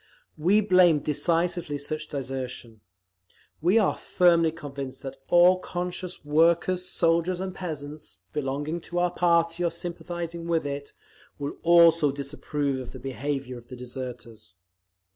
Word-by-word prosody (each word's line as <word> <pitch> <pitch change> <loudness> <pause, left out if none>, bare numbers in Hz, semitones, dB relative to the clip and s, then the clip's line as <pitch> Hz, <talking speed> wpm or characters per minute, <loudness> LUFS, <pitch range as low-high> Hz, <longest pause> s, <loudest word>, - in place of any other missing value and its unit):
We 185 +7 +3
blame 185 -5 +5
decisively 165 +1 0
such 155 +2 -4
desertion. 130 -5 -5 0.8
We 180 +7 +4
are 210 -4 +3
firmly 170 -2 +3
convinced 140 -4 -7
that 135 - -6
all 180 +1 +6
conscious 180 -1 -5
workers, 170 +4 +2
soldiers 170 +1 +1
and 190 0 -4
peasants, 155 -5 -7 0.2
belonging 145 +3 -2
to 175 - -6
our 175 0 +2
party 170 -1 +2
or 170 - +2
sympathising 170 0 -6
with 165 -3 +1
it, 140 0 -5 0.4
will 145 0 -5
also 165 -3 +6
disapprove 140 0 -3
of 125 -2 -8
the 130 - -8
behaviour 135 -1 -4
of 120 - -19
the 125 - -9
deserters…. 120 -5 -8
160 Hz, 130 wpm, -26 LUFS, 140-175 Hz, 0.8 s, all